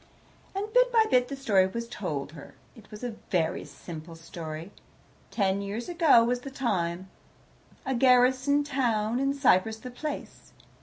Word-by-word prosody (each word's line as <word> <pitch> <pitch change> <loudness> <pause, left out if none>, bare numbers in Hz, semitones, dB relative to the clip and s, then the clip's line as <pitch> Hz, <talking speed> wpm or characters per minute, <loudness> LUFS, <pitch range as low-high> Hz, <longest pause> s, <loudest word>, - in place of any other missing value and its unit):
And 395 +1 -1
bit - - +4
by 450 -2 +5
bit 250 -1 +4
the 275 - -5
story 205 -9 +3
was 235 +5 -5
told 155 -11 -4
her. 150 -3 -12 0.2
It 220 -3 -16
was 210 +2 -10
a 235 -3 -4
very 175 -1 0
simple 165 -1 -10
story. 165 +1 -8 0.6
Ten 195 -2 0
years 205 +4 -5
ago 330 -9 +5
was 245 +1 0
the 275 - -8
time, 185 -9 -2 0.8
a 265 - -1
garrison 255 +3 +4
town 240 -5 0
in 275 +1 +1
Cyprus 220 -5 +3
the 250 +3 -9
place. 295 +4 -7
235 Hz, 155 wpm, -28 LUFS, 185-265 Hz, 0.8 s, by